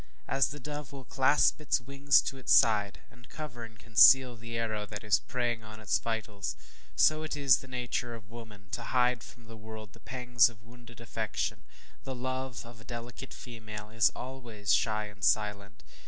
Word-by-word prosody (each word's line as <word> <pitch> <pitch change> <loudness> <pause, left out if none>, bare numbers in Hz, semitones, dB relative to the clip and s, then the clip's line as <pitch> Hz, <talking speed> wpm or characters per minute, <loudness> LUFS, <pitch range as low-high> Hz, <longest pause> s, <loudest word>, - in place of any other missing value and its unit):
As 135 -1 +2
the 145 - -7
dove 145 -1 -6
will 135 -1 -9
clasp 135 +4 +3
its 150 - +1
wings 140 +3 +3
to 135 - -4
its 130 - -3
side, 105 -3 +4
and 120 -1 -18
cover 140 -7 -7
and 115 -1 -11
conceal 125 +3 +6
the 115 +1 -6
arrow 110 -2 -2
that 105 0 -7
is 105 -1 +3
preying 120 -2 -2
on 110 0 -11
its 110 -4 0
vitals 105 -6 -4 0.4
so 155 0 +4
is 145 -5 +3
it - - -9
the 130 - -12
nature 125 -2 -3
of 110 -1 -14
woman, 105 -4 -12
to 120 - -3
hide 125 -1 +2
from 120 -1 -14
the 115 0 -11
world 110 -1 -10
the - - -16
pangs 125 -1 +2
of 110 -2 -18
wounded 120 0 -15
affection. 115 - -3 0.4
The 130 - -5
love 130 -1 -4
of 115 -1 -13
a - - -13
delicate 120 +2 -8
female 110 -3 -9
is 115 -1 +4
always 120 -6 -3
shy 110 -1 +1
and 105 0 -12
silent. 100 -8 0
115 Hz, 185 wpm, -30 LUFS, 110-130 Hz, 0.4 s, conceal